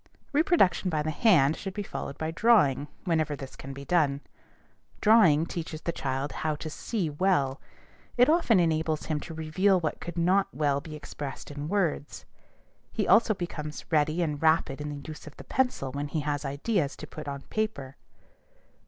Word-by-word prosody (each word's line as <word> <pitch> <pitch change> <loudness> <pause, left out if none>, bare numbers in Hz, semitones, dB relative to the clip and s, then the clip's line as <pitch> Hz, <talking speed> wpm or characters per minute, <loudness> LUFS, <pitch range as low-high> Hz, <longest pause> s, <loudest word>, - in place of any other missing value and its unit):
Reproduction 290 - +3
by 155 -3 0
the 155 - -1
hand 160 - +4
should 195 -2 -6
be 205 - -2
followed 140 - -6
by 160 0 -2
drawing, 165 - +3 0.2
whenever 160 -4 0
this 135 -1 -9
can 135 - -9
be 140 +1 -8
done. 145 -4 +2 0.8
Drawing 195 -9 +5
teaches 165 -2 -5
the 170 - -1
child 135 -2 -3
how 155 -1 -2
to 155 +1 -6
see 200 +1 -2
well. 145 -5 +1 0.6
It 245 +1 +6
often 305 - +4
enables 160 -2 +1
him 155 -2 -1
to 160 - -8
reveal 180 +5 +2
what 160 -3 -3
could 170 0 -6
not 185 +4 +3
well 140 -1 0
be 155 0 -8
expressed 145 -2 -7
in 145 +1 -5
words. 175 -7 -1 0.7
He - - -1
also 225 -1 +5
becomes 150 -4 -6
ready 155 +2 +2
and 150 -3 -3
rapid 155 -3 +2
in 150 - -4
the 145 0 -7
use 155 0 -9
of 150 - -12
the - - -9
pencil 250 - -1
when 145 +2 -3
he 150 +2 -2
has 145 0 -2
ideas 145 +3 -1
to - - -8
put 155 0 -9
on 140 -1 -5
paper. 150 -12 -3
155 Hz, 180 wpm, -28 LUFS, 145-185 Hz, 0.8 s, It